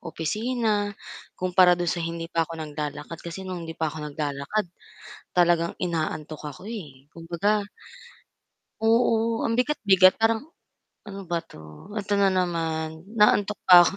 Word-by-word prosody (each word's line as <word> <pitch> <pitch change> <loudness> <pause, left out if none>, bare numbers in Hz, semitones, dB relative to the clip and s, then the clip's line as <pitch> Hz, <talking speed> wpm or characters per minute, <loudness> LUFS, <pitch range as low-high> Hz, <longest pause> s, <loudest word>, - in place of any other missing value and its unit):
opisina, 210 +5 -1 0.4
kumpara 180 0 +4
do'n 175 -2 -1
sa - - -2
hindi 165 0 -4
pa 165 -1 +1
ako 165 - -7
naglalakad, 150 0 -5
kasi 170 +3 -7
no'ng 180 -3 -6
hindi 165 - -6
pa 160 -1 -1
ako 160 - -8
naglalakad 145 +7 -2 0.7
talagang 170 -1 +3
inaantok 155 -3 -3
ako, 145 - -9
eh, 145 - -9
kumbaga 180 +6 -1 1.2
oo 230 0 +3
ang 230 - +1
bigat-bigat 200 -9 +5
parang, 225 0 +3 0.7
"Ano 200 -1 -7
ba 170 - +1
'to, - - -14 0.4
eto 205 0 -4
na 200 -1 +5
naman, 165 -3 -1 0.2
inaantok 210 -1 +3
pa 180 - +9
ako," - - +1
175 Hz, 135 wpm, -25 LUFS, 160-205 Hz, 1.2 s, pa